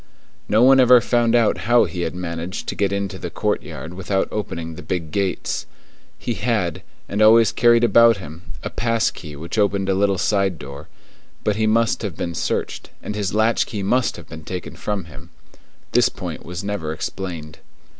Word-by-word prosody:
No 110 +3 +4
one 135 +1 +7
ever 125 -1 +7
found 120 0 +2
out 115 -3 +3
how 120 0 +6
he 90 - -4
had 85 0 -3
managed 85 +1 -5
to - - -2
get 100 -1 0
into 100 -1 -3
the - - -5
courtyard 80 - -3
without 95 +1 -1
opening 85 -6 -4
the - - -9
big 85 -4 -4
gates. 100 0 -2 0.5
He 120 - -3
had, 105 -5 -1 0.3
and 105 - -2
always 110 0 +6
carried 120 0 +4
about 115 0 +6
him, 80 -2 -10 0.2
a - - -4
pass 115 -1 +1
key 75 -4 -10
which 85 +8 -4
opened 100 -1 +1
a - - +3
little 100 0 +2
side 95 -1 +1
door; 70 +2 -9 0.6
but 105 - +1
he 110 0 +1
must 115 +1 +2
have 100 -8 -4
been 85 - -3
searched, - - -3
and - - -4
his 105 -1 -2
latch 110 +2 +2
key 105 -3 -4
must 125 +5 +1
have - - -11
been 80 -1 -10
taken 90 +2 -6
from 100 -4 -3
him. 75 -3 -13 0.6
This - - +4
point - - -7
was 90 +2 -6
never 100 -6 -3
explained. 80 -2 -6
100 Hz, 185 wpm, -21 LUFS, 85-110 Hz, 0.6 s, one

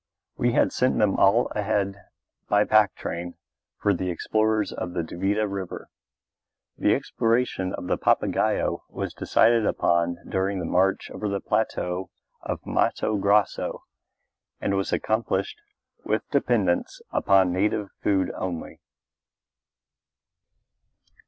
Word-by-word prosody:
We 120 0 +1
had - - +3
sent 130 - +1
them 105 -2 +2
all 105 +5 +4
ahead 100 -2 -1 0.5
by 105 0 +4
pack 105 -3 +4
train 85 +1 -5 0.4
for 100 - +2
the 90 0 -2
explorers 110 +4 0
of 90 - -5
the 85 - -1
Duvida 100 +6 -1
River. 100 -2 -6 0.8
The - - +2
exploration 115 -5 0
of - - -7
the - - -1
Papagaio - - +1
was - - -5
decided 115 0 +3
upon 85 -3 +1
during 95 +1 -1
the 90 - -3
march 95 +3 +1
over 105 - -3
the 100 0 -1
plateau 95 -4 -1 0.3
of - - -5
Matto 110 - 0
Grosso 100 +1 +1 0.8
and - - -1
was 95 0 -1
accomplished 110 -3 -1 0.4
with - - -1
dependence 100 -8 +1
upon 95 -2 +3
native 100 +2 0
food 95 -3 +1
only. 90 -3 -5
100 Hz, 120 wpm, -25 LUFS, 90-105 Hz, 0.8 s, all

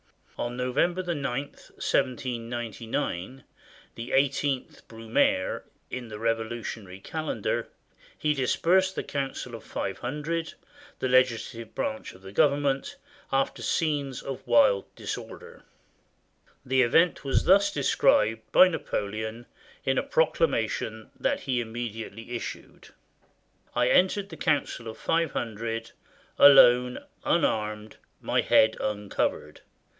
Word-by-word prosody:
On 120 +1 -4
November 155 +9 0
9, 170 -4 -2 0.2
1799, 120 -4 -3 0.5
the 120 +2 -7
eighteenth 140 0 0
Brumaire, 115 -4 0 0.3
in 125 -1 -5
the 105 -1 -8
Revolutionary 115 -3 -3
calendar, 155 -1 -3 0.5
he 150 -1 +1
dispersed 180 +8 +2
the - - -2
Council 135 -3 -4
of 115 - -8
Five 95 - -4
Hundred, 150 +6 -3 0.4
the - - -1
legis 130 -1 +3
lative 115 -1 -10
branch 275 -1 -3
of 95 - -17
the 95 - -9
Government, 140 +2 +1 0.4
after 135 0 0
scenes 145 -5 -1
of 135 -1 -6
wild 100 -4 +4
dis - - -4
order. - - -11 1.0
The 130 0 +3
event 165 +9 +3
was 135 - +1
thus 200 +2 +5
described 115 - +3
by 185 - +8
Napoleon 110 - -4 0.4
in 135 0 +2
a - - -1
proc 160 0 +1
lamation 110 -6 -1
that - - 0
he 125 -2 0
immediately 115 -1 -6
issued: 120 - -7 0.3
— - - -38
" - - -42
I - - +3
entered 195 +2 +3
the - - -9
Council 130 -5 0
of 110 - -7
Five 165 -2 0
Hundred, 115 0 -4 0.5
alone, 125 -3 +7 0.2
unarmed, 105 0 0 0.2
my - - +1
head 110 0 +4
uncovered. 105 -1 -2
125 Hz, 120 wpm, -27 LUFS, 115-145 Hz, 1.0 s, by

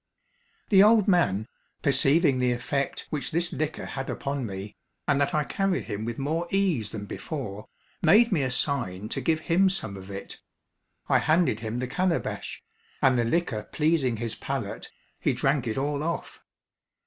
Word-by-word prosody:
The 195 -2 +7
old 215 0 +6
man, 110 - +2 0.4
perceiving 140 0 +4
the 125 -1 +2
effect 135 +3 -2
which 150 -2 -2
this 170 +2 -1
liquor 155 +2 -2
had 135 0 -5
upon 140 -3 -3
me, 95 +1 -7 0.3
and 140 0 +3
that 140 - +1
I 150 - +2
carried 195 +4 0
him 105 +2 -4
with 115 0 -4
more 160 +5 -1
ease 180 - +1
than 105 -1 -6
before, 105 -5 -6 0.3
made 230 +3 +6
me 170 -7 +2
a 130 - 0
sign 120 -7 -2
to - - -3
give 160 -2 +1
him 185 +4 +3
some 110 - -3
of 95 0 -10
it. 100 0 -7 0.7
I - - +4
handed 155 -8 +2
him 110 +1 -4
the 125 - -1
calabash, 180 +6 -2 0.4
and 130 -1 +4
the 120 - +2
liquor 130 -5 0
pleasing 150 -6 +1
his 115 0 -3
palate, 135 -7 -4 0.3
he - - +1
drank 135 -3 +1
it 110 - -2
all 140 +1 -1
off. 170 +2 -4
140 Hz, 170 wpm, -27 LUFS, 115-165 Hz, 0.7 s, The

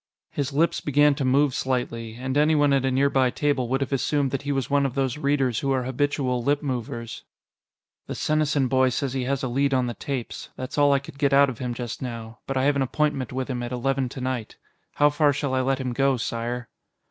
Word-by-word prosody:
His 140 -1 -2
lips 155 +5 +1
began 145 0 +4
to 140 - -3
move 135 +1 +3
slightly, 115 -4 -2
and 130 +2 -4
anyone 145 -1 +4
at 135 -1 +2
a - - +2
nearby 130 0 +3
table 140 -2 0
would 135 +3 0
have 135 0 -2
assumed 140 0 +1
that 135 - -2
he 140 0 -3
was 135 -3 -1
one 140 0 +2
of 135 -3 -1
those 135 -3 0
readers 135 -5 +1
who 135 - -1
are 130 -1 +1
habitual 130 -1 0
lip 145 +4 +1
movers. 120 -3 -4 0.8
"The - - -4
Senesin 150 -3 +1
boy 130 +1 +3
says 130 +1 -2
he 130 -2 -2
has 135 +1 -1
a - - 0
lead 135 +2 +1
on 130 -1 +2
the 120 - -3
tapes. 130 -1 -5
That's 130 - -6
all 145 0 +5
I 140 - +5
could 140 0 -9
get 140 -1 +2
out 140 0 +5
of 120 - -11
him 125 -2 -3
just 120 -1 -5
now, 115 -3 -6
but 135 - -2
I 130 - +2
have 145 +1 +3
an 140 - +1
appointment 135 -1 0
with 130 0 -3
him 125 -2 -3
at 120 0 -4
eleven 130 +1 0
tonight. 130 -3 -4 0.4
How 145 0 +4
far 145 0 +3
shall 140 -1 -2
I 130 - +2
let 135 +1 0
him 130 -2 -2
go, 135 +1 +2
Sire?" 120 +1 -3
135 Hz, 230 wpm, -25 LUFS, 125-140 Hz, 0.8 s, all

